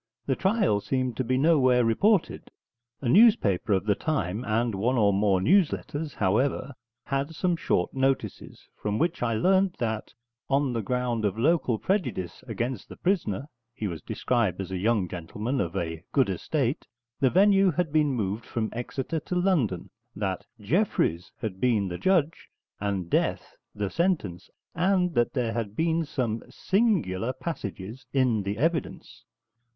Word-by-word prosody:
The 135 Hz, -, +1 dB
trial 190 Hz, -, +2 dB
seemed 130 Hz, +1 st, -1 dB
to 130 Hz, -, 0 dB
be 130 Hz, +1 st, 0 dB
nowhere 130 Hz, -5 st, +4 dB
reported. 195 Hz, -, +1 dB, 0.5 s
A 135 Hz, -, -2 dB
newspaper 170 Hz, -, +4 dB
of 95 Hz, +1 st, +1 dB
the 105 Hz, -, +3 dB
time, 110 Hz, -, -2 dB
and 115 Hz, +1 st, 0 dB
one 115 Hz, +7 st, 0 dB
or 100 Hz, -3 st, +4 dB
more 100 Hz, -1 st, +2 dB
news 175 Hz, -, +4 dB
letters, 150 Hz, 0 st, -5 dB
however, 120 Hz, +8 st, +1 dB, 0.3 s
had 140 Hz, +3 st, -2 dB
some 180 Hz, +1 st, +1 dB
short 90 Hz, -, 0 dB
notices, 135 Hz, 0 st, -2 dB
from 105 Hz, 0 st, -1 dB
which 170 Hz, +5 st, 0 dB
I 115 Hz, -2 st, +1 dB
learnt 190 Hz, -, +2 dB
that, 110 Hz, -3 st, -3 dB, 0.4 s
on 135 Hz, -1 st, +1 dB
the 115 Hz, -, -1 dB
ground 125 Hz, 0 st, -1 dB
of 105 Hz, 0 st, 0 dB
local 130 Hz, -2 st, +2 dB
prejudice 125 Hz, -, -2 dB
against 120 Hz, -2 st, -3 dB
the -, -, -9 dB
prisoner 160 Hz, -, -1 dB, 0.3 s
(he 110 Hz, -, -4 dB
was 85 Hz, -5 st, -4 dB
described 115 Hz, -8 st, -1 dB
as 95 Hz, -1 st, -5 dB
a 95 Hz, -, -2 dB
young 105 Hz, -2 st, +1 dB
gentleman 105 Hz, +10 st, -3 dB
of 85 Hz, 0 st, -3 dB
a 80 Hz, -3 st, -3 dB
good 135 Hz, -7 st, +3 dB
estate), 130 Hz, -, -2 dB, 0.3 s
the 135 Hz, -2 st, +4 dB
venue 195 Hz, +3 st, +5 dB
had 165 Hz, -2 st, -1 dB
been 150 Hz, -2 st, +3 dB
moved 110 Hz, -2 st, -2 dB
from 110 Hz, -2 st, -2 dB
Exeter 135 Hz, +6 st, -3 dB
to 180 Hz, -, -5 dB
London; 170 Hz, -, 0 dB, 0.2 s
that 95 Hz, -2 st, -3 dB
Jeffreys 105 Hz, -, 0 dB
had 100 Hz, -5 st, -4 dB
been 110 Hz, -6 st, +2 dB
the 90 Hz, -, -5 dB
judge, 170 Hz, -5 st, +1 dB, 0.3 s
and 100 Hz, -3 st, -2 dB
death -, -, -1 dB, 0.2 s
the 100 Hz, -1 st, -2 dB
sentence, 165 Hz, -, -1 dB, 0.2 s
and 180 Hz, 0 st, +2 dB
that 120 Hz, -3 st, +1 dB
there 120 Hz, -4 st, -1 dB
had 110 Hz, -3 st, -3 dB
been 165 Hz, +2 st, +1 dB
some 120 Hz, -6 st, -2 dB
'singular 175 Hz, -, 0 dB
passages' 120 Hz, -, -6 dB
in 125 Hz, -6 st, +2 dB
the 100 Hz, +1 st, -3 dB
evidence. 160 Hz, +3 st, -2 dB
125 Hz, 155 wpm, -27 LUFS, 105-160 Hz, 0.5 s, venue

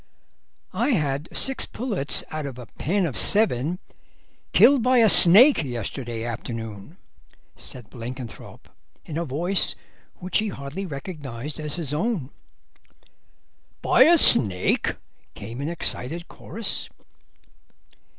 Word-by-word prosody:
"I 285 Hz, -, 0 dB
had 145 Hz, 0 st, -3 dB
six 270 Hz, -1 st, 0 dB
pullets 210 Hz, -, -2 dB
out 155 Hz, -2 st, -5 dB
of 130 Hz, -3 st, -9 dB
a 125 Hz, -, -10 dB
pen 180 Hz, -, -3 dB
of 145 Hz, -, -5 dB
seven 175 Hz, -, +2 dB, 0.7 s
killed 275 Hz, -2 st, +5 dB
by 250 Hz, +2 st, +2 dB
a 230 Hz, -2 st, +5 dB
snake 205 Hz, -, +8 dB
yesterday 120 Hz, -2 st, -6 dB
afternoon," 115 Hz, -, -8 dB, 0.6 s
said 125 Hz, -4 st, -9 dB
Blenkinthrope, 120 Hz, -1 st, -10 dB, 0.4 s
in 160 Hz, 0 st, -5 dB
a 170 Hz, -, -3 dB
voice 170 Hz, +7 st, -1 dB, 0.4 s
which 185 Hz, +3 st, -2 dB
he 215 Hz, -, -2 dB
hardly 165 Hz, +2 st, -7 dB
recognised 145 Hz, -3 st, -8 dB
as 150 Hz, -1 st, -5 dB
his 160 Hz, -5 st, -5 dB
own. 160 Hz, -, -3 dB, 1.5 s
"By -, -, +5 dB
a 340 Hz, +1 st, +5 dB
snake?" 100 Hz, -, +5 dB, 0.4 s
came 115 Hz, +6 st, -9 dB
in 145 Hz, -, -4 dB
excited 170 Hz, 0 st, -3 dB
chorus. 225 Hz, -1 st, -6 dB
150 Hz, 115 wpm, -23 LUFS, 125-195 Hz, 1.5 s, snake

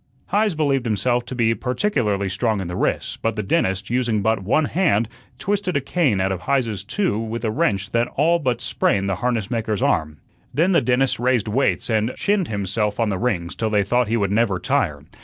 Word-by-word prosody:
Heise 210 Hz, -3 st, +2 dB
believed 140 Hz, -5 st, +1 dB
himself 120 Hz, +3 st, 0 dB
to 130 Hz, -, -6 dB
be 115 Hz, -2 st, +2 dB
particularly 125 Hz, -, 0 dB
strong 105 Hz, +3 st, 0 dB
in 95 Hz, -, -4 dB
the 90 Hz, -, -5 dB
wrists, -, -, -1 dB
but 115 Hz, -1 st, -1 dB
the 105 Hz, -, -2 dB
dentist, 95 Hz, +1 st, 0 dB
using 120 Hz, -4 st, +1 dB
but 110 Hz, -1 st, +1 dB
one 135 Hz, +11 st, +2 dB
hand, 145 Hz, -, +1 dB, 0.3 s
twisted 195 Hz, -4 st, -1 dB
a -, -, +2 dB
cane 135 Hz, -, +1 dB
out 95 Hz, +1 st, +1 dB
of 95 Hz, -1 st, -3 dB
Heise's 115 Hz, -6 st, -1 dB
two 175 Hz, -, -1 dB
with 115 Hz, +1 st, -4 dB
a 110 Hz, -, 0 dB
wrench 105 Hz, -7 st, 0 dB
that 120 Hz, +1 st, +1 dB
all 165 Hz, +4 st, +3 dB
but 125 Hz, -5 st, -1 dB
sprained 100 Hz, -4 st, 0 dB
the 95 Hz, -2 st, -1 dB
harnessmaker's 110 Hz, -2 st, -1 dB
arm. 75 Hz, -1 st, 0 dB, 0.3 s
Then 170 Hz, +5 st, +2 dB
the 175 Hz, -, +4 dB
dentist 130 Hz, 0 st, +1 dB
raised 120 Hz, -3 st, +1 dB
weights 130 Hz, +6 st, 0 dB
and 110 Hz, +1 st, 0 dB
chinned 200 Hz, -4 st, +1 dB
himself 105 Hz, +1 st, -2 dB
on 115 Hz, -2 st, +2 dB
the 95 Hz, -2 st, -2 dB
rings 95 Hz, -8 st, -1 dB
till 110 Hz, -, -1 dB
they 105 Hz, -1 st, +2 dB
thought 120 Hz, +4 st, +1 dB
he 115 Hz, +2 st, +1 dB
would 100 Hz, -3 st, 0 dB
never 105 Hz, -3 st, +2 dB
tire. -, -, -1 dB
115 Hz, 205 wpm, -22 LUFS, 100-130 Hz, 0.3 s, the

